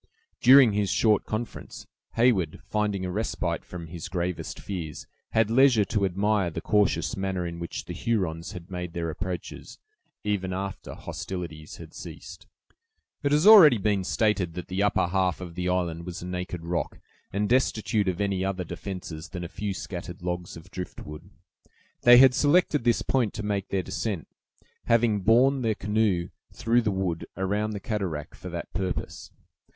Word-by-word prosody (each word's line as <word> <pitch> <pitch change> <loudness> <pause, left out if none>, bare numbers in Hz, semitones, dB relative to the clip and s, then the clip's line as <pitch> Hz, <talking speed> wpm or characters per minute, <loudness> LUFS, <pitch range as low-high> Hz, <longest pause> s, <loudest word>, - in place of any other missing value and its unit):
During 130 -3 +7
his 100 -1 0
short 105 +1 +2
conference, 110 +1 -5 0.3
Heyward, 110 -10 +2
finding 105 -3 -1
a 90 - -3
respite 110 +5 -2
from 85 -2 -8
his 85 0 -7
gravest 90 -1 -3
fears, 85 -6 -6 0.3
had 110 -1 +3
leisure 125 -4 +5
to 100 +1 0
admire 100 0 +1
the 80 - -5
cautious 90 -6 +1
manner 95 -2 -2
in 85 0 -5
which 85 - -5
the - - -6
Hurons 95 -5 -2
had 90 0 -10
made 90 -2 -5
their 85 -1 -2
approaches, 90 +2 -6 0.5
even 95 -3 -1
after 95 0 -5
hostilities 85 -4 -6
had - - -11
ceased. - - -10 0.7
It 140 -1 0
has 150 +4 +3
already 185 - +10
been 100 -1 0
stated 100 -4 0
that 90 - -6
the 95 +2 -1
upper 105 -2 +2
half 90 -2 0
of 90 -2 -7
the 90 +1 -2
island 85 -2 -1
was 90 -1 -6
a - - -6
naked 90 -2 -5
rock, 85 0 -2 0.3
and 105 +2 0
destitute 110 -4 +1
of 90 -1 -1
any 100 -2 0
other 95 -1 -2
defenses 90 -2 -7
than 90 -1 -6
a - - -4
few 100 +3 -4
scattered 90 -2 -7
logs 90 -1 -4
of 85 +3 -14
driftwood. 75 -4 -8 0.7
They 120 0 +8
had 130 0 +8
selected 145 -1 +3
this 120 -1 +3
point 120 -6 0
to 110 - -4
make 100 -2 -2
their 95 -2 -1
descent, 95 - -3 0.6
having 115 -3 +3
borne 125 +7 +4
the 110 -3 +1
canoe 105 -5 0 0.2
through 120 0 +2
the 110 - 0
wood 95 -4 -2
around 105 +3 -1
the 100 - -4
cataract 95 -9 -3
for - - -8
that - - -6
purpose. 95 -1 -4
95 Hz, 165 wpm, -26 LUFS, 90-110 Hz, 0.7 s, already